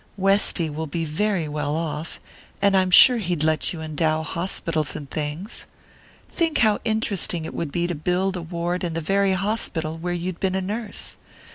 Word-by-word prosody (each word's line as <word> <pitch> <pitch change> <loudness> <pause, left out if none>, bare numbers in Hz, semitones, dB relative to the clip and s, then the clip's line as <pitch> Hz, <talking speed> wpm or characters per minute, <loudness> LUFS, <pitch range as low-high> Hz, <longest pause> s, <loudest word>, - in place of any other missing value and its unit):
Westy 195 -3 +4
will 155 +1 -4
be 165 +3 -3
very 175 +2 -1
well 150 0 -2
off 160 -1 -4 0.4
and 200 0 +3
I'm 185 -1 +3
sure 245 +7 +8
he'd 175 -6 -1
let 155 0 +2
you 165 - -6
endow 155 0 0
hospitals 165 -3 -2
and 145 - -6
things. 155 +8 -4 0.6
Think 330 -2 0
how 215 -1 +2
interesting 200 -6 0
it - - -6
would 165 -4 -4
be 175 +2 0
to 175 - -1
build 180 +5 0
a 180 - -4
ward 170 +2 -3
in 170 -2 -2
the 165 - -1
very 195 +4 +2
hospital 180 -5 -1
where 175 +2 -3
you'd 175 0 -4
been 190 -1 0
a - - +1
nurse! 210 +2 -4
175 Hz, 180 wpm, -23 LUFS, 160-195 Hz, 0.6 s, sure